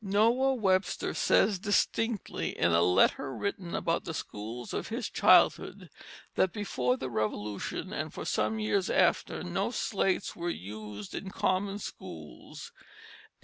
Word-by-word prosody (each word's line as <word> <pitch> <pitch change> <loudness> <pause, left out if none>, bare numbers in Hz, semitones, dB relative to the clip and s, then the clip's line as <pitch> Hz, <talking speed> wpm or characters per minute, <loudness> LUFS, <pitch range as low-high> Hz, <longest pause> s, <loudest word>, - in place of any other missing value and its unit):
Noah 230 +7 +3
Webster 190 -5 +1
says 200 -4 +3
distinctly 215 +2 0
in 85 - +3
a 85 +1 +4
letter 90 +9 +3
written 195 -3 -3
about 165 -2 0
the 165 - -5
schools 115 +2 -6
of - - -3
his - - -3
childhood, - - +4 0.4
that 190 - +2
"before 130 - -1
the 130 - -4
Revolution 105 -3 -3
and - - -3
for - - -7
some 110 +1 0
years 110 - 0
after - - +2
no - - -1
slates 195 -2 -1
were 175 0 -3
used 105 - -7
in 195 - -5
common 195 +1 0
schools." 80 - -9
170 Hz, 135 wpm, -30 LUFS, -, 0.4 s, a